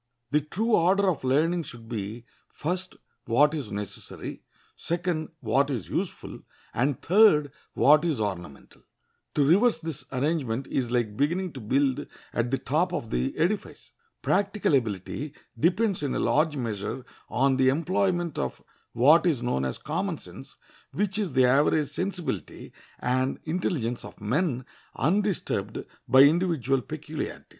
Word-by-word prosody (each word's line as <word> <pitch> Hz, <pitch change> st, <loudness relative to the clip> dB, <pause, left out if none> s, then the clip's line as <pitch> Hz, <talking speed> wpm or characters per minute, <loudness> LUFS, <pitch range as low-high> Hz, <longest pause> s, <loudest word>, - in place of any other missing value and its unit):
The 150 Hz, -, +3 dB
true 205 Hz, +11 st, -2 dB
order 195 Hz, +2 st, +4 dB
of 155 Hz, -, -6 dB
learning 155 Hz, +7 st, +2 dB
should 120 Hz, -7 st, -10 dB
be, 115 Hz, +1 st, -5 dB, 0.2 s
first, 180 Hz, +4 st, -3 dB, 0.3 s
what 145 Hz, +6 st, +4 dB
is 140 Hz, -9 st, -4 dB
necessary; 100 Hz, -1 st, -6 dB, 0.3 s
second, 170 Hz, -2 st, -2 dB
what 135 Hz, +5 st, +2 dB
is 120 Hz, -9 st, -3 dB
useful; -, -, -4 dB, 0.3 s
and 135 Hz, +2 st, 0 dB
third, 175 Hz, -7 st, +5 dB, 0.2 s
what 150 Hz, +2 st, +6 dB
is 160 Hz, -8 st, 0 dB
ornamental. 95 Hz, -8 st, -5 dB, 0.5 s
To 145 Hz, -, +3 dB
reverse 200 Hz, -, +4 dB
this 160 Hz, -4 st, -5 dB
arrangement 135 Hz, -3 st, -1 dB
is 125 Hz, -3 st, -1 dB
like 120 Hz, -4 st, 0 dB
beginning 170 Hz, -, 0 dB
to 130 Hz, -, -7 dB
build 135 Hz, +4 st, 0 dB, 0.3 s
at 120 Hz, 0 st, 0 dB
the 135 Hz, -, +1 dB
top 165 Hz, +8 st, 0 dB
of 115 Hz, -, -4 dB
the -, -, -1 dB
edifice. 180 Hz, +7 st, -2 dB, 0.3 s
Practical 200 Hz, -2 st, +1 dB
ability 130 Hz, -, -1 dB, 0.2 s
depends 190 Hz, +3 st, +2 dB
in 140 Hz, -3 st, -1 dB
a -, -, 0 dB
large 150 Hz, 0 st, +2 dB
measure 115 Hz, +1 st, -4 dB, 0.2 s
on 135 Hz, +1 st, +2 dB
the 130 Hz, 0 st, +4 dB
employment 175 Hz, +2 st, 0 dB
of 65 Hz, -, -3 dB, 0.3 s
what 150 Hz, +9 st, +5 dB
is 140 Hz, -8 st, +1 dB
known 65 Hz, -, 0 dB
as 65 Hz, -, -3 dB
common -, -, -2 dB
sense, -, -, -12 dB, 0.4 s
which 205 Hz, +1 st, -1 dB
is 200 Hz, -5 st, -2 dB
the 130 Hz, -1 st, +5 dB
average 145 Hz, +3 st, +3 dB
sensibility 180 Hz, +2 st, -4 dB, 0.2 s
and 130 Hz, +2 st, 0 dB
intelligence 155 Hz, -, -2 dB
of -, -, -11 dB
men 125 Hz, -, 0 dB, 0.3 s
undisturbed 195 Hz, +5 st, 0 dB, 0.2 s
by 130 Hz, -, +7 dB
individual 145 Hz, -4 st, +2 dB
peculiarities. -, -, -6 dB
145 Hz, 140 wpm, -27 LUFS, 125-175 Hz, 0.5 s, by